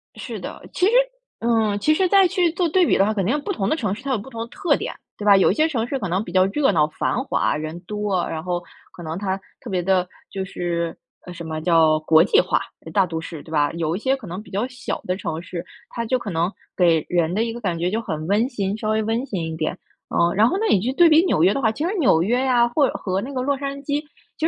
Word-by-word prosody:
是 - - -6
的， - - -8
其 365 - +2
实 410 - +4 0.5
嗯， 225 -3 +1
其 305 +10 +3
实 370 +4 +2
再 390 0 +5
去 355 -2 +1
做 350 +1 0
对 360 +3 +4
比 - - +3
的 195 - +4
话， 215 - +1
肯 195 -3 -1
定 275 +10 +1
不 400 - -3
同 195 - -1
的 - - +2
城 215 -11 -1
市 230 - -8
它 275 - -2
有 255 - +2
不 210 +5 -9
同 230 -3 -6
的 230 - -4
特 290 +5 +1
点， 465 +4 -4 0.2
对 210 - -6
吧？ 205 -1 +7
有 190 - +4
一 - - -1
些 310 0 +3
城 240 -8 -1
市 270 +1 -2
可 195 - -3
能 185 +4 0
比 175 - -9
较 185 +1 +4
热 270 +6 +2
闹 155 -5 +3
繁 235 +10 -2
华 - - +1
人 155 +3 -5
多， 205 -1 -2
然 160 -1 -4
后 175 0 -2 0.3
可 175 - -11
能 160 +1 -4
它 190 -1 -2 0.2
特 245 - -9
别 185 -3 0
地 185 0 +2 0.2
就 195 - -3
是， 170 -3 -3 0.3
呃， 180 - -8
什 170 - -8
么 155 -1 -4
叫 160 -2 +4
国 160 +1 +5
际 405 - +4
化 - - +1 0.3
大 195 -2 +4
都 165 -2 -4
市， 160 -2 -8
对 160 - -13
吧？ 145 -2 +2
有 165 0 -1
一 - - -3
些 265 +4 +1
可 265 -5 -11
能 180 +2 -6
比 215 - -15
较 200 +4 -1
小 255 0 -5
的 180 - -1
城 165 -4 -4
市， 175 -1 -6 0.3
它 235 - -4
就 255 +3 +1
可 215 -5 -6
能 170 +3 0 0.2
给 165 -4 +3
人 170 -1 +1
的 215 +4 +1
一 230 -1 -3
个 240 - -8
感 180 -6 -1
觉 175 +2 -1
就 225 +2 -1
很 155 -7 -4
温 215 +6 +2
馨， 200 -6 -2
稍 215 0 -3
微 220 0 +1
温 225 +4 -1
馨 195 -10 -3
一 - - -5
点。 160 +3 -2 0.3
呃， 170 0 +2
然 215 +3 +5
后 250 - 0
呢 425 - -1
你 195 - +4
就 245 +7 -1
对 340 +3 +6
比 315 +2 +6
纽 160 - +2
约 190 +3 +5
的 275 - -2
话， 225 - +3
其 280 +7 -4
实 370 - -1
纽 170 - +4
约 240 +7 +1
啊， 240 -2 +4
或 275 +3 +3
者 - - -4
和 185 -1 -2
那 265 +6 -6
个 255 - -1
洛 280 +2 0
杉 275 0 -4
矶， 285 +1 -1 0.4
其 320 - +1
205 Hz, 305 characters per minute, -22 LUFS, 175-260 Hz, 0.5 s, 吧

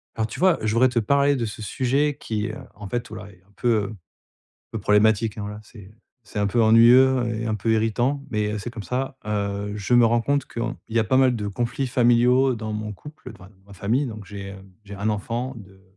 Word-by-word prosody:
Alors, 110 -1 -1
tu 110 - -8
vois? 185 -2 +4
Je 110 0 0
voudrais 130 +2 +4
te 120 -1 0
parler 140 +5 +2
de 120 - -1
ce 105 0 -7
sujet 135 +7 0
qui, 105 -2 -3
heu, - - -6 0.2
en 105 -1 -9
fait, 120 +3 -3
voilà, 105 -2 -9
est 90 -2 -22
un - - -27
peu, 120 - -1
heu, 105 +2 -6 0.8
peu 110 - -4
problématique, 110 +2 +2
hein, - - -4
voilà. 105 +1 -6
C'est 105 -2 -14 0.3
c'est 105 - -6
un 105 - +1
peu 115 +4 +1
ennuyeux, 120 +3 +6 0.2
et 115 - -4
un 110 -1 -1
peu 110 +2 -1
irritant, 120 +5 +1
mais 105 -1 -1
heu, - - -2
c'est 105 +4 -5
comme 115 -3 -8
ça. 130 +3 -3
Heu, 100 -1 -2
je 105 +3 -2
me 120 -1 +6
rends 115 +1 +2
compte 140 +3 0
que - - -8
en 120 +1 -3
il 115 - -8
y - - +5
a 110 - +2
pas 130 +5 +1
mal 130 -2 +4
de 105 -2 -4
conflits 120 +6 -2
familiaux 125 +1 +3
dans 110 -1 -5
mon 105 0 -4
couple, 145 +4 -12
d - - -16
enfin 95 - -14
dans 95 -1 -27
ma 100 - -13
famille, 110 +9 0
donc 110 -3 -8
j'ai, 100 -1 -8
hem, 95 0 -11
j'ai 100 0 -9
un 100 +2 -1
enfant 115 +5 -3
de 95 -2 -14
110 Hz, 250 wpm, -23 LUFS, 105-125 Hz, 0.8 s, ennuyeux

